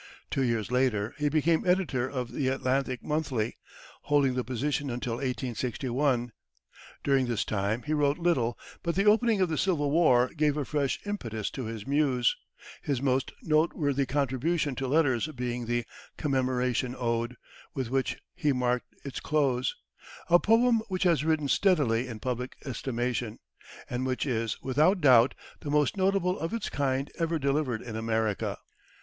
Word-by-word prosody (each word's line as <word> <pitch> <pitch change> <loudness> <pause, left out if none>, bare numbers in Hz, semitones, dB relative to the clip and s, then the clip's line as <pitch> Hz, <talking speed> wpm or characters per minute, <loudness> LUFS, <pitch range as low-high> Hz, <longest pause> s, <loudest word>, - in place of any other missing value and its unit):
Two 135 - 0
years 115 -2 0
later, 125 -4 +1
he 145 0 +2
became 160 +2 +2
editor 175 -9 +1
of 125 -3 -4
the 135 - -1
Atlantic 130 -1 0
Monthly, 135 -8 -2 0.5
holding 145 -3 +3
the 125 0 -1
position 140 +4 -2
until 120 -1 -3
1861. 125 0 -1 0.7
During 135 -2 +2
this 115 -2 -1
time, 105 +3 -1
he 150 - -2
wrote 145 -1 +2
little, 155 -10 +1 0.2
but 170 -1 -1
the 195 +2 +2
opening 220 0 +4
of 185 - +2
the 160 - -1
Civil 155 -7 +1
War 130 -6 +4
gave 150 -1 +2
a 145 - -1
fresh 140 -2 -1
impetus 115 - -3
to 130 - -5
his 110 -2 -6
muse, 135 -4 +2 0.5
his 140 -4 -1
most 130 -1 0
noteworthy 155 -3 +1
contribution 140 +3 0
to 135 - -2
letters 140 -3 +2
being 125 -4 -4
the 120 0 0 0.3
"Commemoration 130 -3 0
Ode" 120 0 -1 0.4
with 130 -3 -3
which 135 -1 0 0.2
he 150 -5 +1
marked 125 -1 -1
its 140 - -5
close 135 -5 +1 0.6
a 175 - +8
poem 230 +2 +4
which 185 -2 -1
has 170 -5 +3
risen 155 -2 +1
steadily 135 - +2
in 115 -3 -7
public 125 +1 -3
estimation, 120 -3 -2 0.5
and 125 +1 -2
which 130 +1 -1
is, 115 -4 -1
without 155 +9 +3
doubt, 130 -5 +6 0.2
the 145 - -6
most 150 -2 +2
notable 190 -1 +1
of 165 +8 -2
its 230 - -3
kind 135 -1 -1
ever 165 0 +1
delivered 140 -4 0
in 115 -3 -7
America. 110 -2 -1
135 Hz, 155 wpm, -28 LUFS, 125-155 Hz, 0.7 s, a